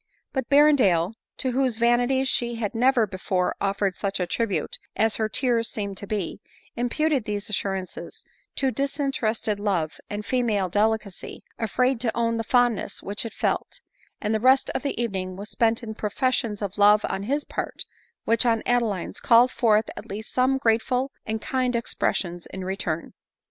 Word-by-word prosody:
But 265 Hz, -3 st, -2 dB
Berrendale, 255 Hz, -, +5 dB, 0.2 s
to 260 Hz, -, -1 dB
whose 255 Hz, -2 st, +1 dB
vanity 245 Hz, +3 st, +3 dB
she 240 Hz, -2 st, 0 dB
had 225 Hz, -1 st, -3 dB
never 245 Hz, 0 st, +3 dB
be 190 Hz, -2 st, -8 dB
fore 180 Hz, -1 st, 0 dB
offered 195 Hz, -1 st, 0 dB
such 200 Hz, -1 st, -2 dB
a 180 Hz, -, +1 dB
tribute 205 Hz, +3 st, -2 dB, 0.2 s
as 220 Hz, 0 st, +2 dB
her 220 Hz, -1 st, 0 dB
tears 230 Hz, 0 st, +1 dB
seemed 200 Hz, -2 st, -4 dB
to 200 Hz, -, -7 dB
be, 200 Hz, -5 st, -3 dB, 0.3 s
im 240 Hz, +1 st, -1 dB
puted 305 Hz, -4 st, +1 dB
these 210 Hz, 0 st, -3 dB
assurances 195 Hz, -2 st, -4 dB, 0.3 s
to 270 Hz, -1 st, +1 dB
disinterested 270 Hz, -7 st, -1 dB
love 185 Hz, -7 st, -1 dB
and 205 Hz, 0 st, -4 dB
female 220 Hz, -6 st, +1 dB
delicacy, 210 Hz, 0 st, -1 dB, 0.2 s
afraid 250 Hz, +3 st, +1 dB
to 235 Hz, -2 st, -1 dB
own 230 Hz, -1 st, +1 dB
the 225 Hz, -, -1 dB
fondness 240 Hz, -3 st, +1 dB
which 205 Hz, +3 st, -2 dB
it -, -, -10 dB
felt; -, -, -2 dB, 0.4 s
and 210 Hz, 0 st, -1 dB
the 220 Hz, -, +1 dB
rest 260 Hz, +3 st, +4 dB
of -, -, -2 dB
the 280 Hz, -, -3 dB
evening 190 Hz, -5 st, -2 dB
was 200 Hz, +2 st, -7 dB
spent 230 Hz, 0 st, +1 dB
in 220 Hz, -1 st, -5 dB
professions 215 Hz, 0 st, -1 dB
of 200 Hz, +1 st, -4 dB
love 210 Hz, +1 st, +6 dB
on 190 Hz, -, -3 dB
his 280 Hz, +8 st, -1 dB
part, -, -, -4 dB, 0.4 s
which 230 Hz, +1 st, +3 dB
on 230 Hz, -2 st, +2 dB
Adeline's, 230 Hz, -7 st, 0 dB
called 240 Hz, +2 st, +5 dB
forth 220 Hz, -2 st, +3 dB
at -, -, -9 dB
least 215 Hz, +2 st, -6 dB
some 260 Hz, +1 st, +3 dB
grateful 250 Hz, +2 st, +1 dB, 0.2 s
and 220 Hz, 0 st, -3 dB
kind 255 Hz, -2 st, 0 dB
expressions 175 Hz, -6 st, -1 dB
in 190 Hz, -1 st, -7 dB
return. 175 Hz, -4 st, -3 dB
225 Hz, 170 wpm, -25 LUFS, 200-250 Hz, 0.4 s, love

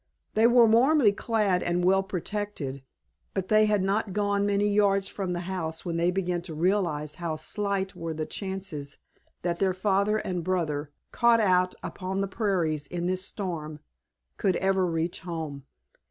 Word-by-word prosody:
They 220 Hz, +2 st, +5 dB
were 240 Hz, -1 st, +6 dB
warmly 235 Hz, +2 st, +5 dB
clad 205 Hz, -3 st, +1 dB
and 175 Hz, 0 st, 0 dB
well 195 Hz, +1 st, +4 dB
protected, 190 Hz, -7 st, -4 dB, 0.5 s
but 190 Hz, -1 st, -2 dB
they 215 Hz, 0 st, +5 dB
had 210 Hz, -2 st, +2 dB
not 195 Hz, +1 st, 0 dB
gone 205 Hz, 0 st, +1 dB
many 205 Hz, 0 st, +2 dB
yards 200 Hz, -1 st, +3 dB
from 190 Hz, -3 st, -3 dB
the 175 Hz, -, -3 dB
house 175 Hz, -3 st, -4 dB
when 170 Hz, -1 st, -2 dB
they 170 Hz, +1 st, +2 dB
began 180 Hz, -1 st, -1 dB
to 170 Hz, -3 st, -7 dB
realize 165 Hz, -4 st, 0 dB
how 165 Hz, -2 st, -1 dB
slight 195 Hz, +4 st, -2 dB
were 165 Hz, -1 st, -4 dB
the 155 Hz, 0 st, -2 dB
chances 190 Hz, -7 st, -5 dB, 0.5 s
that 170 Hz, -1 st, -1 dB
their 190 Hz, -2 st, +2 dB
father 200 Hz, +2 st, +2 dB
and 180 Hz, -5 st, -3 dB
brother, 155 Hz, -5 st, -1 dB, 0.2 s
caught 235 Hz, -1 st, +4 dB
out 185 Hz, -3 st, +3 dB
upon 190 Hz, +1 st, -3 dB
the 195 Hz, -, 0 dB
prairies 175 Hz, -8 st, -1 dB
in 175 Hz, +2 st, -3 dB
this 185 Hz, +1 st, -1 dB
storm, 165 Hz, -7 st, -5 dB, 0.6 s
could 190 Hz, -3 st, +1 dB
ever 190 Hz, -1 st, +2 dB
reach 165 Hz, 0 st, -2 dB
home. 155 Hz, -6 st, -6 dB
185 Hz, 165 wpm, -27 LUFS, 170-200 Hz, 0.6 s, were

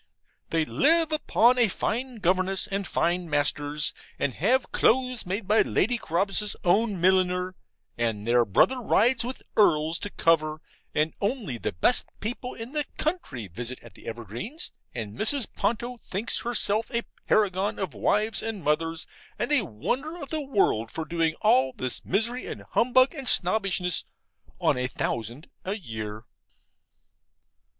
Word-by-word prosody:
They 165 Hz, -1 st, +1 dB
live 320 Hz, -, +3 dB
upon 250 Hz, -5 st, +3 dB
a 235 Hz, -, +5 dB
fine 245 Hz, +6 st, -2 dB
governess 185 Hz, -1 st, +1 dB
and 200 Hz, -2 st, -3 dB
fine 175 Hz, 0 st, 0 dB
masters, 145 Hz, 0 st, 0 dB, 0.2 s
and 135 Hz, -, -1 dB
have 245 Hz, -, +1 dB
clothes 250 Hz, -3 st, +2 dB
made 195 Hz, +2 st, -3 dB
by 215 Hz, +2 st, +5 dB
Lady 240 Hz, +4 st, +1 dB
Carabas's 195 Hz, +4 st, +1 dB
own 200 Hz, +2 st, +2 dB
milliner; 185 Hz, 0 st, +2 dB, 0.5 s
and 110 Hz, -3 st, -1 dB
their 120 Hz, +1 st, +4 dB
brother 245 Hz, -, +3 dB
rides 235 Hz, +2 st, +3 dB
with 250 Hz, +2 st, -6 dB
earls 160 Hz, -5 st, +3 dB
to 205 Hz, -, -4 dB
cover; 155 Hz, -4 st, +2 dB, 0.4 s
and 155 Hz, +1 st, +1 dB
only 200 Hz, -, -2 dB
the 105 Hz, -, -2 dB
best 85 Hz, -, +2 dB
people 245 Hz, +3 st, -4 dB
in 230 Hz, +2 st, -8 dB
the 300 Hz, 0 st, -1 dB
county 225 Hz, -, -3 dB
visit 120 Hz, +8 st, -5 dB
at -, -, -13 dB
the -, -, -15 dB
Evergreens, 120 Hz, -, -6 dB, 0.2 s
and 110 Hz, -3 st, -6 dB
Mrs. 235 Hz, -, +1 dB
Ponto 240 Hz, +2 st, -1 dB
thinks 210 Hz, 0 st, -3 dB
herself 220 Hz, -2 st, 0 dB
a 235 Hz, 0 st, -1 dB, 0.2 s
paragon 195 Hz, -1 st, +2 dB
of 190 Hz, -, -3 dB
wives 215 Hz, +2 st, +1 dB
and 220 Hz, -5 st, -4 dB
mothers, 165 Hz, +2 st, 0 dB, 0.3 s
and -, -, -2 dB
a 295 Hz, -4 st, +5 dB
wonder 255 Hz, -, -3 dB
of 280 Hz, -, -7 dB
the 315 Hz, -1 st, -1 dB
world, 195 Hz, -, +1 dB
for 160 Hz, -, -5 dB
doing 165 Hz, -1 st, 0 dB
all 130 Hz, -11 st, +4 dB
this 130 Hz, -1 st, -3 dB
misery 230 Hz, +6 st, 0 dB
and -, -, -7 dB
humbug, 255 Hz, +4 st, +4 dB
and 275 Hz, -5 st, -2 dB
snobbishness, 180 Hz, -2 st, +2 dB, 0.6 s
on -, -, +2 dB
a 125 Hz, -, 0 dB
thousand 120 Hz, -, -4 dB, 0.2 s
a 195 Hz, +2 st, -2 dB
year. 110 Hz, -, -6 dB
195 Hz, 150 wpm, -26 LUFS, 150-235 Hz, 0.6 s, a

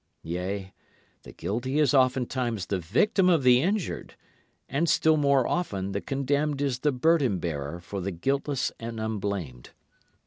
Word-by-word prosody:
Yea, 95 Hz, +3 st, -4 dB, 0.5 s
the -, -, -12 dB
guilty 125 Hz, +7 st, -3 dB
is 150 Hz, -4 st, +3 dB
oftentimes 125 Hz, -5 st, +1 dB
the 95 Hz, +1 st, -2 dB
victim 180 Hz, -, +2 dB
of 165 Hz, -6 st, +3 dB
the 125 Hz, 0 st, +6 dB
injured, 195 Hz, +3 st, -2 dB, 0.5 s
And 155 Hz, +5 st, 0 dB
still 160 Hz, 0 st, +4 dB
more 140 Hz, -4 st, +3 dB
often 100 Hz, -, -2 dB
the 100 Hz, -, -2 dB
condemned 140 Hz, +1 st, -1 dB
is 135 Hz, -4 st, -1 dB
the 150 Hz, +2 st, +2 dB
burden 135 Hz, -, +2 dB
bearer 80 Hz, -2 st, -4 dB
for 95 Hz, +3 st, -6 dB
the 95 Hz, -, -2 dB
guiltless 135 Hz, -, -1 dB
and 115 Hz, 0 st, -6 dB
unblamed. 100 Hz, -, -4 dB
125 Hz, 145 wpm, -27 LUFS, 100-145 Hz, 0.5 s, the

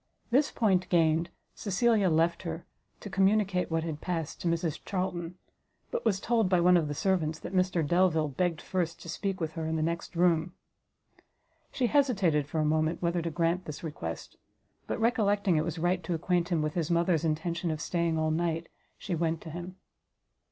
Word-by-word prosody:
This 275 Hz, +4 st, +4 dB
point 185 Hz, -6 st, +1 dB
gained, 165 Hz, 0 st, +3 dB, 0.2 s
Cecilia 210 Hz, 0 st, +2 dB
left 165 Hz, +1 st, +2 dB
her, 165 Hz, -1 st, -5 dB, 0.4 s
to 205 Hz, -, -7 dB
communicate 195 Hz, -1 st, +2 dB
what 165 Hz, -1 st, 0 dB
had 155 Hz, -2 st, -5 dB
passed 165 Hz, -4 st, -3 dB
to -, -, -2 dB
Mrs 165 Hz, -2 st, -1 dB
Charlton; 180 Hz, -3 st, -3 dB, 0.6 s
but 485 Hz, 0 st, -2 dB
was 195 Hz, -2 st, +2 dB
told 225 Hz, -2 st, +1 dB
by 180 Hz, -1 st, +4 dB
one 180 Hz, +1 st, +5 dB
of 165 Hz, -3 st, +2 dB
the 145 Hz, -, -3 dB
servants 160 Hz, -3 st, 0 dB
that 180 Hz, -, -8 dB
Mr 185 Hz, -3 st, +2 dB
Delvile 165 Hz, -1 st, +3 dB
begged 165 Hz, +3 st, -1 dB
first 170 Hz, -3 st, -2 dB
to 170 Hz, -, -9 dB
speak 195 Hz, +3 st, -3 dB
with 160 Hz, -2 st, -2 dB
her 160 Hz, -1 st, -4 dB
in 160 Hz, -, -1 dB
the 155 Hz, -, 0 dB
next 170 Hz, +2 st, -3 dB
room. 170 Hz, 0 st, +2 dB, 1.2 s
She 255 Hz, -, 0 dB
hesitated 200 Hz, -, +2 dB
for 160 Hz, -, -2 dB
a 155 Hz, -, +2 dB
moment 155 Hz, +2 st, +1 dB
whether 170 Hz, 0 st, +1 dB
to 165 Hz, -, -2 dB
grant 170 Hz, +3 st, 0 dB
this 150 Hz, +1 st, -7 dB
request; 85 Hz, -, -6 dB, 0.5 s
but -, -, -2 dB
recollecting 205 Hz, -6 st, +2 dB
it 155 Hz, -, +2 dB
was 165 Hz, 0 st, -4 dB
right 175 Hz, +2 st, +1 dB
to 170 Hz, -, -1 dB
acquaint 175 Hz, +1 st, 0 dB
him 165 Hz, -4 st, +1 dB
with 155 Hz, 0 st, -2 dB
his 165 Hz, -2 st, -1 dB
mother's 170 Hz, -1 st, +2 dB
intention 165 Hz, +2 st, -1 dB
of 155 Hz, -1 st, -2 dB
staying 170 Hz, 0 st, 0 dB
all 155 Hz, 0 st, +1 dB
night, 165 Hz, 0 st, -1 dB, 0.3 s
she 195 Hz, -, -4 dB
went 165 Hz, -1 st, 0 dB
to 160 Hz, -, -8 dB
him. 175 Hz, +3 st, -7 dB
170 Hz, 190 wpm, -29 LUFS, 160-185 Hz, 1.2 s, one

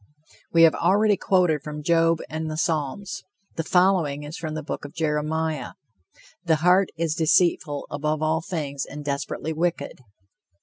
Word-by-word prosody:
We 165 Hz, 0 st, +5 dB
have 165 Hz, -, +7 dB
already 205 Hz, +4 st, +3 dB
quoted 180 Hz, -7 st, +2 dB
from 150 Hz, 0 st, -7 dB
Job 165 Hz, 0 st, +3 dB
and 160 Hz, 0 st, -4 dB
the 155 Hz, -, -4 dB
Psalms; 165 Hz, +2 st, -2 dB, 0.3 s
the 165 Hz, -, -2 dB
following 175 Hz, -5 st, +2 dB
is 150 Hz, +2 st, -7 dB
from 155 Hz, -2 st, -5 dB
the 155 Hz, -, -4 dB
book -, -, -5 dB
of 145 Hz, -, -9 dB
Jeremiah: 155 Hz, 0 st, -1 dB, 0.7 s
"The 165 Hz, -3 st, +3 dB
heart 185 Hz, +1 st, +5 dB
is 165 Hz, -1 st, 0 dB
deceitful 160 Hz, -2 st, +2 dB
above 150 Hz, +1 st, -2 dB
all 160 Hz, +1 st, +1 dB
things 145 Hz, -5 st, -4 dB
and 145 Hz, +1 st, -8 dB
desperately 145 Hz, +2 st, -3 dB
wicked." 165 Hz, -4 st, -2 dB
160 Hz, 150 wpm, -24 LUFS, 150-170 Hz, 0.7 s, have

